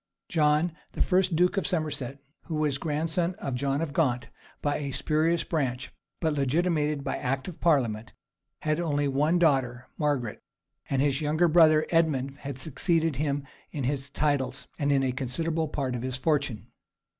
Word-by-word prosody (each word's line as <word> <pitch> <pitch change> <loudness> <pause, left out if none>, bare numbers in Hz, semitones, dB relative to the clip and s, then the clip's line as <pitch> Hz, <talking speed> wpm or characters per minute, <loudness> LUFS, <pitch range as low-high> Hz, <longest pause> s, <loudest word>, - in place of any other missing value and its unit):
John, 155 +1 +3 0.2
the - - -2
first 185 -1 +2
duke 180 +4 +3
of 195 - +1
Somerset 150 -7 -2 0.3
who 165 - -4
was 150 -3 0
grandson 165 +3 -1
of 135 - -4
John 140 +3 0
of 160 -4 -3
Gaunt, 125 -7 0 0.3
by 145 0 0
a 145 -2 -4
spurious 155 +4 +1
branch 130 -6 -2 0.3
but 160 -2 +1
legitimated 150 +1 +1
by - - -2
act 130 +1 -2
of 180 - -8
parliament, 120 -9 +1 0.5
had 155 +1 0
left 170 -2 -1
only 145 0 +1
one 150 +5 +2
daughter, 130 -7 +2
Margaret; 140 -8 -1 0.5
and 135 0 +2
his 140 0 +1
younger 155 +3 +2
brother, 155 -2 +6
Edmund, 145 -5 +1
had 140 -2 -6
succeeded 160 +2 0
him 145 -1 -1 0.3
in 145 - -4
his 140 +1 -1
titles, 140 -2 -1
and 145 -1 +1
in 135 -1 +3
a 130 - +1
considerable 155 +6 -1
part 135 -4 -2
of 120 - -3
his 130 0 -3
fortune. 140 -6 -1
145 Hz, 165 wpm, -27 LUFS, 135-160 Hz, 0.5 s, brother